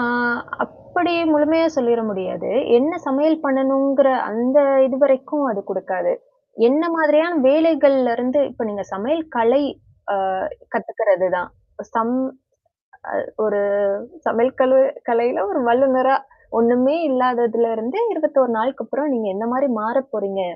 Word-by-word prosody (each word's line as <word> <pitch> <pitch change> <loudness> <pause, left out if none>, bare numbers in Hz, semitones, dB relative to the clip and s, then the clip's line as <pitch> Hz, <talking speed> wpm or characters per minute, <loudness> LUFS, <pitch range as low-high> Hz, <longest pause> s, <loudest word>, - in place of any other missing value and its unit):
ஆ, 240 - 0 0.6
அப்படி 350 -1 -3 0.2
முழுமையா 310 +2 +3
சொல்லிட 235 -3 +1
முடியாது. 190 -2 -5 0.3
என்ன 285 +7 0 0.2
சமையல் 310 +3 +1
பண்ணணும்ங்கிற 270 0 +2 0.2
அந்த 245 +6 +2 0.3
இதுவரைக்கும் 270 +1 +1
அது 205 -3 -3
கொடுக்காது. 190 - -2 0.6
என்ன 285 +6 +2
மாதிரியான 315 +2 +3
வேலைகள்ல 285 -4 +4
இருந்து 255 +4 -1
இப்ப 240 - -8
நீங்க 200 -2 -6
சமையல் 285 +12 -2
கலை, 235 +5 +3 0.5
அ - - 0 0.6
கத்துக்கிறதுதான். 185 -4 -1 0.4
சம் 230 +1 0 1.1
அ, - - -9 0.2
ஒரு 205 -1 0 0.7
சமையல் 240 +4 0
கழு 265 0 +5 0.3
கலையில 235 +1 +1
ஒரு 310 -6 -1
வல்லுநரா 260 +1 +3 0.4
ஒண்ணுமே 245 +5 +3
இல்லாததுல 240 -3 +1
இருந்து 230 - -5
21 295 -7 +1
நாளுக்கு 265 +5 -2
அப்புறம் 280 +6 -3
நீங்க 225 -4 -2
என்ன 220 +3 -4
மாரி 270 +3 +1
மாறப் 265 +5 -2
போறீங்க 200 -2 -4
260 Hz, 120 wpm, -19 LUFS, 230-285 Hz, 1.1 s, கழு